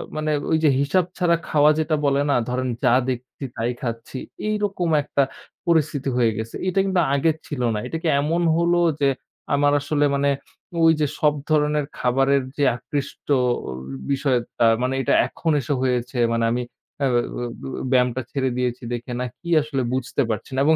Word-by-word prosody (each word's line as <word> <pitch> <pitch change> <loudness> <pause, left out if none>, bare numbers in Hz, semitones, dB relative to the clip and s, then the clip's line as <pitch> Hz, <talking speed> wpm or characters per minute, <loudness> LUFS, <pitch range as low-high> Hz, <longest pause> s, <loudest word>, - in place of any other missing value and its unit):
মানে 155 0 -1 0.2
ওই 160 - +4
যে 150 - +6
হিসাব 165 +6 +2
ছাড়া 170 -2 +3
খাওয়া 150 0 +4
যেটা 155 0 +1
বলে 140 0 +3
না, - - +3
ধরেন 130 +1 -1 0.2
যা 125 -1 +5 0.2
দেখছি 125 +2 -5
তাই 115 +2 -1
খাচ্ছি, 115 +1 -5 0.3
এইরকম 205 -5 -1
একটা 140 -1 +1 0.4
পরিস্থিতি 150 -4 +1
হয়ে 115 -2 +3
গেছে। 110 +1 -5
এটা 185 +1 +1
কিন্তু 190 -2 +2
আগের 150 +3 +2
ছিল 140 -4 -4
না। 105 - -1
এটা 165 - -3
কি - - 0
এমন 165 +4 0 0.2
হল 170 +1 +2 0.3
যে 140 - +4 0.5
আমার 145 0 +3
আসলে 145 0 +1
মানে 140 0 +2 0.5
ঐ - - +2 0.2
যে 150 - +3
সব 150 -1 +4 0.2
ধরনের 150 -1 +2
খাবারের 135 +2 +2
যে 145 - +1
আকৃষ্টর 140 +1 -2 0.7
বিষয়টা। 130 -4 +1 0.2
মানে 130 +1 0
এটা - - +1
এখন 165 - -2
এসে 145 - -2
হয়েছে, 125 0 -1 0.2
মানে 115 0 +1
আমি 125 +1 0 0.4
আ - - +4 0.9
ব্যায়ামটা 125 0 +2
ছেড়ে 130 -2 0
দিয়েছি 125 0 -2
দেখে, 120 +1 -5
না 125 - -1
কি? 170 - -8
আসলে 140 -3 -2
বুঝতে 130 +2 -1
পারছি 110 +4 -3
না - - 0
এবং 160 +1 +5
140 Hz, 170 wpm, -23 LUFS, 125-155 Hz, 0.9 s, যে